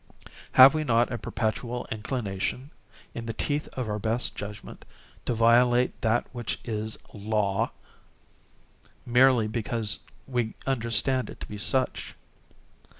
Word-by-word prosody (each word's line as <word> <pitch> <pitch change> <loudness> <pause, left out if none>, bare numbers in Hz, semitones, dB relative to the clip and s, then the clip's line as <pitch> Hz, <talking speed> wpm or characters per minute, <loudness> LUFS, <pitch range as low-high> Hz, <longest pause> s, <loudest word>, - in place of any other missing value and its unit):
Have 130 +1 +10
we 155 0 0
not 120 -3 +2
a 120 - -3
perpetual 120 +3 -3
inclination, 110 +3 -3 0.4
in 115 0 -6
the 115 - -3
teeth 145 0 -1
of 130 -3 -3
our 105 0 -2
best 115 +4 0
judgment, 105 0 -8 0.4
to 120 - 0
violate 120 +2 +4
that 115 +1 +2
which 120 -3 -4
is 110 -1 -3 0.2
Law, 105 -2 0 1.4
merely 125 -2 +4
because 110 -1 -2 0.3
we 120 -4 -2
understand 130 0 +1
it - - -10
to - - -4
be 105 - -8
such? 130 +5 0
115 Hz, 125 wpm, -27 LUFS, 110-125 Hz, 1.4 s, Have